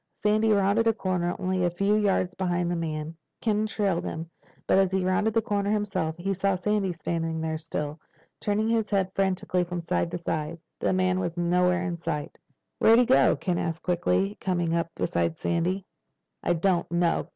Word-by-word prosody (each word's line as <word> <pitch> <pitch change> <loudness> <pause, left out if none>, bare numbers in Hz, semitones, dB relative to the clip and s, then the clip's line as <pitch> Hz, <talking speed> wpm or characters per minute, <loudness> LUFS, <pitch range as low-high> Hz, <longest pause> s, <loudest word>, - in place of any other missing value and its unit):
Sandy 215 +1 +3
rounded 205 +3 +3
a 225 - +4
corner 180 -4 -1
only 185 0 -1
a 175 - +3
few 195 +4 +1
yards 195 -3 +1
behind 175 -2 -1
the - - 0
men. 160 -1 -3 0.2
Ken 215 -1 +1
trailed 200 -5 0
him. 165 +1 -5 0.3
But - - +4
as 190 -1 +3
he 190 -1 0
rounded 210 +4 +1
the 225 - +3
corner 205 -3 -1
himself 195 -6 -1
he 195 +3 -1
saw 195 +1 +1
Sandy 195 +1 0
standing 165 -1 -2
still, 150 -1 -4 0.4
turning 210 +1 0
his 225 -2 +1
head 195 -2 +1
frantically 185 -2 0
from 175 -1 -5
side 170 - 0
to 175 - -3
side. 160 -1 -3 0.2
The - - +1
man 185 0 +2
was 175 -2 -3
nowhere 180 +1 +2
in 175 -2 -2
sight. 150 -3 -4 0.4
"Where'd 225 +1 +6
he 245 - +5
go?" 135 - +5
Ken 175 +5 -1
asked 165 0 -3
quickly, 100 - +1
coming 175 -3 0
up 170 0 0
beside 85 -1 -1
Sandy. 180 +3 -1 0.6
"I - - +1
don't 175 +1 +1
know." 170 -1 +1
180 Hz, 185 wpm, -27 LUFS, 170-195 Hz, 0.6 s, Where'd